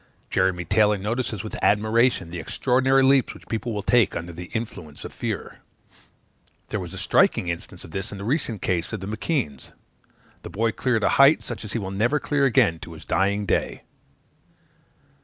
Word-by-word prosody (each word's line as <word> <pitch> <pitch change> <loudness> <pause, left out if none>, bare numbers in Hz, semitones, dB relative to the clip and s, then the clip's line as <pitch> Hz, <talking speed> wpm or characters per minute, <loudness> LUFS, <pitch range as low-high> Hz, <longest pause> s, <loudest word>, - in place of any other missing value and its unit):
Jeremy 90 -1 +1
Taylor 105 +3 +3
notices 110 0 -3
with 110 - -7
admiration, 110 -3 +2
the 85 - -5
extraordinary 130 +9 +2
leaps 135 -1 +3
which - - -15
people 115 +1 -3
will 105 -2 -3
take 115 -2 +3
under 85 +1 -5
the 90 +2 -7
influence 85 -10 -6
of - - -8
fear. - - -5 1.1
There - - -2
was - - -7
a - - -8
striking 85 - +2
instance 85 +1 -6
of 85 - -12
this 95 +5 -4
in 100 - -7
the 100 - -7
recent 120 - -1
case 90 -3 -1
of 110 - -3
the 95 - -6
M'Keands; 105 - -3 0.7
the - - -8
boy 115 +2 0
cleared 115 -2 0
a - - +3
height, 140 +3 +6
such 120 - -6
as 105 - -6
he - - 0
will 95 -3 -4
never 115 +10 +1
clear 145 -1 +1
again 85 -10 +3
to 85 - -9
his 80 - -12
dying 100 +2 +1
day. 85 - -1
105 Hz, 185 wpm, -24 LUFS, 90-120 Hz, 1.1 s, height